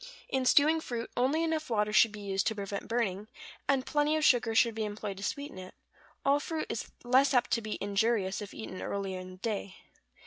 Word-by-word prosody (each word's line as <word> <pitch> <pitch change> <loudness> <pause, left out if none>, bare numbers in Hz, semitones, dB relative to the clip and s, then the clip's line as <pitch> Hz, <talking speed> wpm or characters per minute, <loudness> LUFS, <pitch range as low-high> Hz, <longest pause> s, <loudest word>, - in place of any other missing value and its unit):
In 265 -1 0
stewing 310 +5 +5
fruit 235 -5 -5
only 275 +7 +2
enough 320 -2 -1
water 210 -2 +1
should 225 0 +6
be 210 0 -9
used 195 -1 -1
to 220 - 0
prevent 200 -1 -5
burning, 215 -4 -1 0.4
and 270 -2 +2
plenty 295 +1 +2
of 310 - +1
sugar 230 -3 +4
should 230 0 +4
be 220 0 -2
employed 205 -1 -4
to 195 - -7
sweeten 285 0 -4
it; 185 0 -10 0.5
all 280 +1 +4
fruit 315 +1 -3
is - - -4
less 260 +3 +4
apt 245 - +2
to 230 - +2
be 215 -1 -4
injurious 200 -1 0
if 205 - -7
eaten 185 -4 -7
early 200 -1 -3
in 185 0 -6
the 185 - -11
day. 200 -1 -3
225 Hz, 210 wpm, -30 LUFS, 200-270 Hz, 0.5 s, should